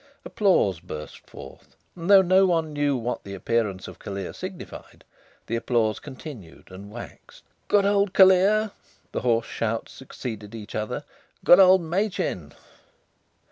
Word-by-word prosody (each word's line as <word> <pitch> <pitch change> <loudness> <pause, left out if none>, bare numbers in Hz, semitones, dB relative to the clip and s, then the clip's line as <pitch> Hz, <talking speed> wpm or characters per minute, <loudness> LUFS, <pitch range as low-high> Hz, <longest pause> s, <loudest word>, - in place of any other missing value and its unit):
Applause 180 - +2
burst 75 -4 -9
forth, - - -13 0.2
and 170 +1 -6
though 195 -1 +8
no 190 +1 +4
one 165 -3 0
knew 145 -2 0
what 120 +1 -4
the 100 0 -7
appearance 105 -2 -1
of - - -11
Callear 100 -2 -6
signified, - - -9 0.4
the 115 - -3
applause 115 -2 0
continued 130 - -11
and 100 +2 -10
waxed. 120 +3 -12 0.2
"Good 200 -1 +3
old 200 -1 +2
Callear!" 195 +3 +5 0.4
The - - -3
hoarse 115 -2 +1
shouts 115 0 -3
succeeded 115 -5 -8
each 105 -2 -9
other. 110 0 -3 0.4
"Good 175 - +8
old 185 -1 +7
Machin!" 175 - -2
125 Hz, 140 wpm, -25 LUFS, -, 0.4 s, though